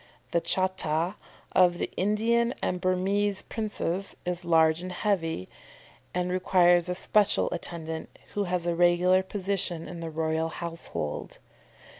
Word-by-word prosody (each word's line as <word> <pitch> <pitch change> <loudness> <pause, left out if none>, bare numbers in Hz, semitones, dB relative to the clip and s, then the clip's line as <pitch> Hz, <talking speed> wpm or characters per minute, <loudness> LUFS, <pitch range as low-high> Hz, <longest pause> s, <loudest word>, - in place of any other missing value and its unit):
The 170 - +2
cháta 185 -2 +1 0.4
of 180 -1 +4
the - - -3
Indian 230 +4 +2
and 180 0 -1
Burmese 195 +2 +1
princes 195 -4 -3
is 180 0 -2
large 160 -1 +4
and 185 0 -5
heavy, 175 - -1 0.6
and 180 0 -1
requires 180 -1 +4
a 180 - -1
special 205 +2 +3
attendant, 160 -2 -5 0.2
who 205 -1 0
has 180 -1 -1
a 175 - +1
regular 175 +2 +4
position 190 -3 -2
in 175 - -7
the 165 -1 -4
royal 160 0 -1
household. 165 - -5
180 Hz, 130 wpm, -28 LUFS, 165-190 Hz, 0.6 s, of